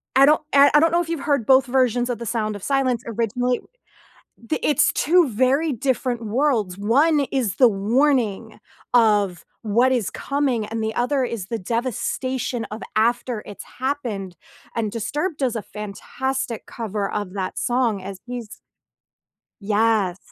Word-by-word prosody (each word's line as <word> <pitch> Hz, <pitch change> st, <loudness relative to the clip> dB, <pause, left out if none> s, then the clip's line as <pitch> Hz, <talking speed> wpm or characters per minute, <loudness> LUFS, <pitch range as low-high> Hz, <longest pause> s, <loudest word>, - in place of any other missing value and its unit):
I 270 Hz, -, +7 dB
don't 305 Hz, +1 st, +4 dB
I 280 Hz, 0 st, +7 dB
I 295 Hz, -, +8 dB
don't 330 Hz, +1 st, +3 dB
know 345 Hz, +1 st, +3 dB
if 330 Hz, -, -6 dB
you've 330 Hz, -4 st, -2 dB
heard 280 Hz, -7 st, 0 dB
both 265 Hz, 0 st, +6 dB
versions 245 Hz, -1 st, +1 dB
of 240 Hz, -, -3 dB
The 235 Hz, -, -6 dB
Sound 215 Hz, -1 st, -1 dB
of 205 Hz, -, -8 dB
Silence 260 Hz, -4 st, 0 dB
originally 235 Hz, +2 st, -1 dB, 0.8 s
the 235 Hz, +7 st, -3 dB
it's 295 Hz, -, +3 dB
2 345 Hz, +1 st, +4 dB
very 260 Hz, +7 st, +2 dB
different 245 Hz, -1 st, -1 dB
worlds. 220 Hz, -5 st, 0 dB
One 280 Hz, +9 st, +3 dB
is 235 Hz, -8 st, 0 dB
the 250 Hz, -, +7 dB
warning 225 Hz, +1 st, 0 dB, 0.3 s
of 205 Hz, -6 st, +3 dB, 0.2 s
what 235 Hz, +4 st, +2 dB
is 230 Hz, -6 st, 0 dB
coming, 275 Hz, -6 st, -1 dB
and 225 Hz, +1 st, -4 dB
the 220 Hz, 0 st, -2 dB
other 260 Hz, +2 st, +1 dB
is 225 Hz, -6 st, -5 dB
the 230 Hz, +2 st, -3 dB
devastation 245 Hz, +3 st, -2 dB
of 215 Hz, -, -6 dB
after 235 Hz, 0 st, +1 dB
it's 205 Hz, -, -9 dB, 0.2 s
happened, 235 Hz, -10 st, -3 dB, 0.4 s
and 225 Hz, -2 st, -1 dB
Disturbed 295 Hz, -, -3 dB
does 255 Hz, -4 st, -1 dB
a -, -, -3 dB
fantastic 230 Hz, +5 st, -4 dB
cover 210 Hz, -3 st, -4 dB
of 205 Hz, -3 st, -4 dB
that 190 Hz, -2 st, -4 dB
song 240 Hz, -5 st, 0 dB
as 190 Hz, 0 st, -8 dB
he's 245 Hz, -3 st, -7 dB, 1.0 s
Yes. 205 Hz, -3 st, +1 dB
240 Hz, 155 wpm, -22 LUFS, 210-265 Hz, 1.0 s, I